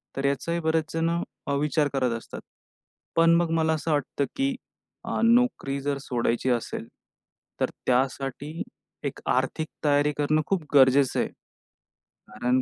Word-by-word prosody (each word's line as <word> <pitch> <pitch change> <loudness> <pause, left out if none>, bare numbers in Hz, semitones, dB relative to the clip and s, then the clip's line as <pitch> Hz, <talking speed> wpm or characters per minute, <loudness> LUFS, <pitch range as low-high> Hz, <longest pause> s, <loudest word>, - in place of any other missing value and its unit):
तर 135 - -2
याचाही 170 +5 0
बरेच 160 -1 0
जण 165 0 +1 0.4
अ, 140 - 0
विचार 150 +1 +1
करत 130 -3 +1
असतात. - - -9 0.7
पण 165 0 +5
मग 170 -1 +2
मला 160 -1 +2
असं 160 +1 -2
वाटतं 145 -1 0
की 270 -1 0 0.5
अ, - - -2
नोकरी 230 - +3
जर 145 0 -1
सोडायची 120 0 0
असेल, 120 -2 -2 0.7
तर - - +1 0.2
त्यासाठी 135 +4 -1 0.4
एक - - -3
आर्थिक 135 +5 0 0.2
तयारी 145 0 +3
करणं 155 +1 +2
खूप 190 -5 0
गरजेचं 135 -1 +5
आहे. - - 0 1.0
कारण 125 +1 0
145 Hz, 140 wpm, -26 LUFS, 135-165 Hz, 1.0 s, पण